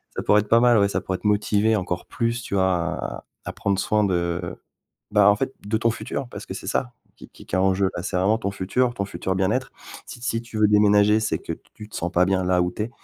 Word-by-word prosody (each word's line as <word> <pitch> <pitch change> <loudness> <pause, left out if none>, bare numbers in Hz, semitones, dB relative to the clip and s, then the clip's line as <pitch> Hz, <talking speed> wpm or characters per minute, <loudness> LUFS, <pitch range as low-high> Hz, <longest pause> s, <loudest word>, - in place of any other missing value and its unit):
Ça - - -3
pourrait 105 0 +4
être 105 - -10
pas 115 - +6
mal, 120 -1 +5
ouais. 100 -1 +3
Ça - - -1
pourrait 95 - -3
te - - -2
motiver 105 +1 +2
encore 90 -3 -3
plus, 115 +1 -2
tu 105 - -4
vois, 95 -1 +3
à 85 -2 -2 0.2
à - - -4
prendre 100 -1 -1
soin 105 +2 +1
de 85 -2 -1 0.6
bah, 105 -1 +6
en 105 - +3
fait, 130 +4 -2
de 105 +2 0
ton 115 +1 +2
futur, 130 +2 -5
parce 105 -3 -8
que - - -6
c'est - - -8
ça 120 +4 -1 0.2
qui - - -13
qui - - -16
qui - - -5
est - - +2
en 95 0 +3
jeu. 95 0 +1
Là 85 - -4
c'est 90 - -3
vraiment 100 +5 +2
ton 100 - -2
futur, 120 +6 0
ton 100 - -2
futur 95 0 -3
bien-être. 95 0 0 0.4
Si - - -10
si 115 -1 -2
tu 115 -2 -7
veux 110 - +5
déménager, 105 +1 +4
c'est 110 - -1
que - - -6 0.2
tu 105 - -11
te - - -17
sens 85 - -2
pas 90 +2 +3
bien 95 0 +1
là 90 0 +2
où 90 - -1
tu 105 - -4
es, 110 - -4
100 Hz, 270 wpm, -23 LUFS, 95-110 Hz, 0.6 s, pas